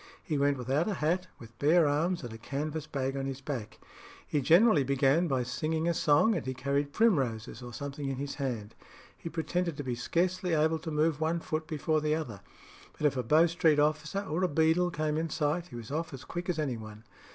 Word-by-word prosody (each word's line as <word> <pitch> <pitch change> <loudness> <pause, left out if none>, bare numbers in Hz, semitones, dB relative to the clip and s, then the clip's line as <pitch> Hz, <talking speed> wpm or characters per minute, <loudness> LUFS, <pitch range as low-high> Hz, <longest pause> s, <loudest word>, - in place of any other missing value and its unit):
He 155 - -2
went 140 0 +2
without 135 - 0
a 205 - -1
hat, 175 +4 0
with 115 0 -14
bare 160 +2 +5
arms, 165 +4 0
and 120 -2 -6
a 115 - -9
canvas 150 +5 -4
bag 135 -1 -2
on 135 0 -2
his 135 -1 -4
back. 130 -5 -5 0.5
He 145 - 0
generally 170 - +5
began 140 +5 +2
by 130 -4 0
singing 155 +6 -1
a 170 - +2
song, 155 +8 +4
and 170 - -2
he 130 0 -4
carried 140 +2 -1
primroses 130 - +1
or 120 0 -8
something 140 +2 -5
in 135 - -2
his 140 +1 -4
hand. 115 -6 -3 0.4
He 165 - -7
pretended 170 0 -2
to 145 - -4
be 125 -2 -2
scarcely 180 +8 0
able 160 +1 +2
to 160 - -6
move 155 0 +1
one 165 +2 +1
foot 155 -1 -3
before 155 0 0
the 155 0 +1
other; 120 - -5 0.6
but 150 - -2
if 145 - +3
a 130 - 0
Bow 155 +8 +5
Street 165 -2 +3
officer 150 +5 +1
or 180 -1 -2
a - - +4
beadle 160 +3 +2
came 155 -2 -1
in 165 +1 -1
sight, 160 +4 -1
he 125 - -11
was 115 +1 -8
off 160 -1 -3
as 130 - -11
quick 175 +1 -5
as 175 - 0
any 140 -6 -1
one. 110 0 -10
150 Hz, 220 wpm, -30 LUFS, 135-165 Hz, 0.6 s, bare